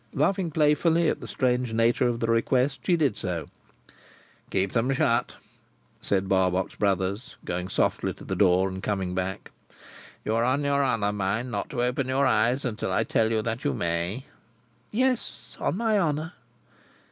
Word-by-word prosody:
Laughing 180 Hz, +4 st, +1 dB
playfully 160 Hz, +2 st, +3 dB
at -, -, -1 dB
the -, -, -8 dB
strange 125 Hz, -2 st, 0 dB
nature 115 Hz, +2 st, +3 dB
of 120 Hz, -1 st, -1 dB
the 115 Hz, -, 0 dB
request, 125 Hz, +3 st, +1 dB
she 175 Hz, -, +3 dB
did 140 Hz, -9 st, +1 dB
so. 90 Hz, -3 st, -3 dB, 1.0 s
"Keep 95 Hz, 0 st, 0 dB
them 120 Hz, +4 st, +1 dB
shut," 120 Hz, -2 st, +1 dB, 0.7 s
said 95 Hz, -1 st, 0 dB
Barbox 95 Hz, -1 st, +1 dB
Brothers, 100 Hz, +3 st, -1 dB
going 90 Hz, +1 st, -3 dB
softly -, -, 0 dB
to -, -, -13 dB
the -, -, -3 dB
door, 95 Hz, -1 st, +4 dB
and 95 Hz, 0 st, -5 dB
coming 95 Hz, -3 st, -2 dB
back. 95 Hz, +1 st, -4 dB, 0.7 s
"You 110 Hz, -, 0 dB
are 115 Hz, +1 st, +2 dB
on 130 Hz, +4 st, +1 dB
your 140 Hz, 0 st, +2 dB
honour, 105 Hz, -6 st, +1 dB
mind, 105 Hz, +5 st, -2 dB
not -, -, -3 dB
to 120 Hz, -3 st, -1 dB
open 125 Hz, +2 st, 0 dB
your 135 Hz, +2 st, +2 dB
eyes 120 Hz, +3 st, +2 dB
until 115 Hz, -4 st, -2 dB
I -, -, +2 dB
tell 110 Hz, -, +1 dB
you 110 Hz, -1 st, +1 dB
that 115 Hz, +1 st, -3 dB
you 70 Hz, -, 0 dB
may?" 85 Hz, -, -2 dB, 0.7 s
"Yes! 255 Hz, +2 st, -1 dB
On -, -, -1 dB
my 220 Hz, -2 st, +2 dB
honour." 160 Hz, -1 st, -1 dB
115 Hz, 170 wpm, -26 LUFS, 95-140 Hz, 1.0 s, door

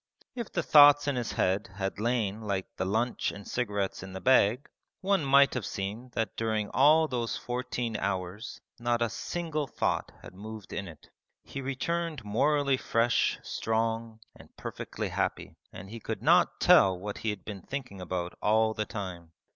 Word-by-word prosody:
If 235 Hz, -4 st, -5 dB
the 170 Hz, -, -1 dB
thoughts 145 Hz, -1 st, +7 dB
in 140 Hz, -, +1 dB
his 120 Hz, -2 st, -2 dB
head 100 Hz, +4 st, 0 dB
had 95 Hz, 0 st, -3 dB
lain 110 Hz, -2 st, 0 dB
like 100 Hz, -3 st, -2 dB
the 95 Hz, -, -2 dB
lunch 115 Hz, +5 st, 0 dB
and 100 Hz, 0 st, -10 dB
cigarettes 105 Hz, -5 st, -2 dB
in 95 Hz, 0 st, -9 dB
the 95 Hz, -, -5 dB
bag, 125 Hz, +1 st, +3 dB, 0.3 s
one 195 Hz, -3 st, +2 dB
might 140 Hz, 0 st, +5 dB
have 125 Hz, -, -2 dB
seen 105 Hz, +7 st, -5 dB
that 110 Hz, -2 st, -2 dB
during 110 Hz, -2 st, -1 dB
all 155 Hz, +4 st, +5 dB
those 120 Hz, -4 st, -2 dB
fourteen 125 Hz, -2 st, -3 dB
hours 95 Hz, +3 st, -3 dB, 0.2 s
not 120 Hz, 0 st, +1 dB
a 115 Hz, -, -1 dB
single 160 Hz, -4 st, -3 dB
thought -, -, -1 dB
had -, -, -11 dB
moved 105 Hz, +2 st, -9 dB
in 100 Hz, -, -4 dB
it. 80 Hz, -3 st, -14 dB, 0.3 s
He 135 Hz, -, -7 dB
returned 150 Hz, +1 st, -2 dB
morally 140 Hz, +5 st, +2 dB
fresh, 115 Hz, -1 st, +1 dB
strong, 115 Hz, 0 st, -2 dB, 0.2 s
and -, -, -15 dB
perfectly -, -, -5 dB
happy, -, -, -2 dB, 0.2 s
and 95 Hz, 0 st, -9 dB
he 115 Hz, -, -7 dB
could -, -, -5 dB
not -, -, +4 dB
tell 95 Hz, -2 st, +6 dB
what 100 Hz, +3 st, -6 dB
he 110 Hz, -, -2 dB
had 105 Hz, -3 st, -5 dB
been 100 Hz, -3 st, -6 dB
thinking 125 Hz, -5 st, -6 dB
about 90 Hz, -1 st, -4 dB
all 110 Hz, +1 st, +3 dB
the 110 Hz, 0 st, -2 dB
time. 90 Hz, -6 st, -7 dB
115 Hz, 170 wpm, -29 LUFS, 100-130 Hz, 0.3 s, thoughts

